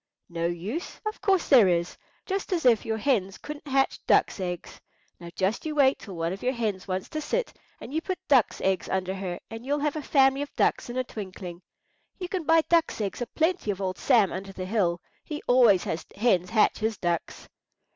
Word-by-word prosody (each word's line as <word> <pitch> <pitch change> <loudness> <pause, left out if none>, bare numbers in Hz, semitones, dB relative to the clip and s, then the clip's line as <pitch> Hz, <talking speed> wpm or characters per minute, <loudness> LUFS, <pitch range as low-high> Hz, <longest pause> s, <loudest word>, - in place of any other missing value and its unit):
"No 170 -1 -1
use! 190 - -5
Of 430 +1 -4
course 385 -3 +2
there 245 -8 +7
is. 170 -1 0 0.3
Just 390 0 -3
as 340 -6 0
if 235 -4 +4
your 220 0 0
hens 205 -6 0
couldn't 300 0 -9
hatch 270 0 +1
ducks' - - +3
eggs. 180 -2 -5 0.4
Now 170 - -9
you - - -9
just 195 +4 0
wait 285 -3 +2
till 195 -4 -9
one 165 +1 -2
of 195 - -8
your 255 +1 0
hens 210 -6 -3
wants 185 0 -3
to 310 - -4
sit, 485 +11 -2 0.3
and - - -9
you 320 - 0
put 370 +1 -3
ducks' 265 -7 +3
eggs 190 -1 0
under 190 0 -1
her, 190 -2 -4
and 225 +1 -7
you'll 285 +3 0
have 300 0 0
a 310 - -3
family 270 -1 +3
of 290 - -5
ducks - - +1
in 240 - -5
a 255 - +1
twinkling. 185 -6 -8 0.6
You 360 -2 -5
can 360 -3 -3
buy 325 +1 +5
ducks' 330 -3 +1
eggs 205 +2 -3
a 245 - -2
plenty 330 - 0
of 200 -2 -1
old 185 -2 -3
Sam 210 -5 +4
under 195 +2 -6
the 185 -1 -6
hill. 185 -4 +1 0.2
He 300 -1 -6
always 235 -7 +5
has 160 - -3
hens 190 -5 +2
hatch 220 -2 +3
his 220 -1 -1
ducks." 175 -2 -3
225 Hz, 215 wpm, -27 LUFS, 185-290 Hz, 0.6 s, there